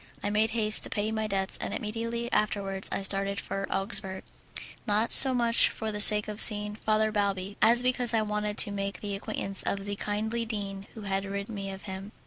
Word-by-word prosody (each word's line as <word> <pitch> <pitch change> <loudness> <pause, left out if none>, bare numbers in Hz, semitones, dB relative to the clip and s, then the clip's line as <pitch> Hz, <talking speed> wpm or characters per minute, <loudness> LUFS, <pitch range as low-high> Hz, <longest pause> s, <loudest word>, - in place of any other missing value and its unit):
I 205 - -2
made 215 +1 +1
haste 220 -1 +5
to - - -5
pay 210 +1 -3
my 220 -1 -3
debts, 195 -1 0
and - - -5
immediately 230 +2 -5
afterwards 195 -2 -1
I - - -4
started 195 +1 -2
for 195 0 -6
Augsburg, 195 -1 -3 0.6
not 215 +2 0
so 270 - +9
much 235 -2 +2
for 220 -1 -6
the 210 0 -4
sake 210 0 +5
of 210 0 -2
seeing 210 -1 +8
Father 215 0 -1
Balbi, 200 -2 -3
as 235 +3 +4
because 250 -1 0
I 225 -2 0
wanted 210 0 -4
to 205 - +3
make 200 0 -5
the 205 -1 -5
acquaintance 195 -1 -5
of 200 0 -4
the 205 0 -5
kindly 220 +3 -4
dean 200 -3 -7
who 220 - -10
had 195 -1 -3
rid 200 +1 -6
me 200 -3 -7
of 195 0 -10
him. 195 +1 -9
210 Hz, 205 wpm, -27 LUFS, 195-220 Hz, 0.6 s, so